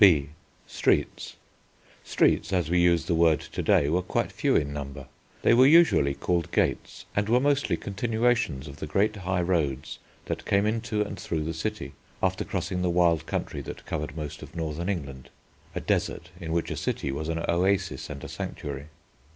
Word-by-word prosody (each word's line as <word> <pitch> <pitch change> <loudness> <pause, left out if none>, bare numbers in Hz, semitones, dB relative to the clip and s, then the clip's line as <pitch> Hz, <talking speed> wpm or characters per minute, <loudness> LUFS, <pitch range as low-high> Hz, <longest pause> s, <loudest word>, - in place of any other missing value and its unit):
B. 70 -5 +1 0.4
STREETS - - 0 0.7
Streets, - - +2
as 90 -4 0
we 90 - +4
use 85 -2 +3
the 85 - 0
word 80 -2 +4
to - - -5
day, 70 - +3
were 85 +5 +2
quite 90 - -1
few - - +1
in 70 -1 +1
number. 70 -1 -6 0.4
They - - +5
were 130 +3 +7
usually 145 - +5
called 85 0 -1
gates - - -1
and 105 +1 +1
were 120 +2 +5
mostly 145 +1 +1
continuations 110 - 0
of 70 0 -9
the 75 - -5
great 105 +7 +1
high 90 -2 -1
roads 75 -7 -1 0.3
that - - -4
came 100 +1 +3
into 110 -1 0
and 100 -2 -7
through 80 -3 -2
the 80 +1 -3
city, 105 +7 -4 0.3
after 95 0 +1
crossing 90 -1 -3
the 90 - +1
wild 85 -2 +2
country - - -3
that - - -8
covered 75 0 -4
most 75 -2 -6
of - - -11
northern 80 +2 -3
England, 70 -9 -4 0.5
a - - 0
desert 85 +1 -1
in 80 -3 -5
which 85 0 -1
a - - -3
city 70 - -2
was 75 +3 -4
an 80 0 -2
oasis 95 +3 +1
and - - -7
a - - -5
sanctuary. 70 0 -6
85 Hz, 185 wpm, -27 LUFS, 75-100 Hz, 0.7 s, were